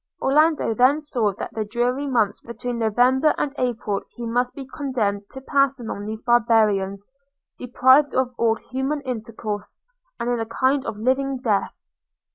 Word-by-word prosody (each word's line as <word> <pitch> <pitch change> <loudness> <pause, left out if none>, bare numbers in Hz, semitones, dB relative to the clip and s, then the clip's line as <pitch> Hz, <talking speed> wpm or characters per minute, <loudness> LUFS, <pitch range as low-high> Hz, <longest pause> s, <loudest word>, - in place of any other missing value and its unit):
Orlando 300 -3 +2
then 255 +6 +4
saw 245 -9 0
that - - -7
the 220 - -2
dreary 245 +6 -1
months 230 -7 +1
between 235 +1 -5
November 250 +6 +3
and 280 - -1
April 230 -5 -1
he 240 - -6
must 245 +2 -1
be 275 - -7
condemned 230 -8 -2
to 265 - -9
pass 275 0 +2
among 210 -3 -6
these 220 +1 -6
barbarians, 215 -5 +2 0.5
deprived 260 +3 +3
of 255 -1 +1
all 230 -1 +2
human 265 +5 -3
intercourse, 225 -5 -5 0.4
and 235 - -3
in 245 -1 0
a 225 - -3
kind 260 +4 0
of 205 - -4
living 265 +4 0
death. 220 -6 -1
245 Hz, 155 wpm, -23 LUFS, 220-265 Hz, 0.5 s, then